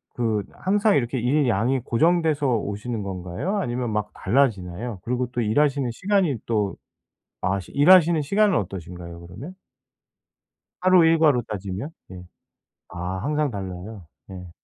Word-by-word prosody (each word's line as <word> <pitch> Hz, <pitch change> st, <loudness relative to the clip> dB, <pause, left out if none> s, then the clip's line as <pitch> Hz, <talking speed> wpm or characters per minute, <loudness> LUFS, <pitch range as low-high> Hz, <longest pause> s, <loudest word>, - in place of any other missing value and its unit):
그 110 Hz, -3 st, 0 dB
항상 205 Hz, +2 st, +1 dB
이렇게 130 Hz, -1 st, 0 dB
일 135 Hz, +4 st, +2 dB
양이 120 Hz, +4 st, +1 dB
고정돼서 155 Hz, +4 st, +1 dB
오시는 105 Hz, +2 st, -4 dB
건가요, 95 Hz, -, -4 dB
아니면 120 Hz, -4 st, -2 dB
막 105 Hz, 0 st, -2 dB
달라지나요? 105 Hz, -3 st, 0 dB
그리고 125 Hz, +1 st, -1 dB
또 125 Hz, -, -1 dB
일하시는 135 Hz, +3 st, +1 dB
시간이 185 Hz, -, +1 dB
또 105 Hz, -4 st, 0 dB, 0.7 s
아 95 Hz, +1 st, 0 dB
시 90 Hz, -, -13 dB
일하시는 170 Hz, +2 st, +5 dB
시간은 200 Hz, +5 st, +2 dB
어떠신가요 90 Hz, -3 st, -7 dB
그러면? 125 Hz, -, -9 dB, 1.3 s
하루 185 Hz, -2 st, +5 dB
일과로 155 Hz, -6 st, +4 dB
따지면? 100 Hz, +5 st, -5 dB, 0.2 s
예. 90 Hz, -1 st, -9 dB, 0.7 s
아 90 Hz, +2 st, -4 dB
항상 150 Hz, -1 st, 0 dB
달라요? 95 Hz, -1 st, -7 dB, 0.2 s
예. 90 Hz, -2 st, -9 dB
120 Hz, 300 characters per minute, -24 LUFS, 95-150 Hz, 1.3 s, 일하시는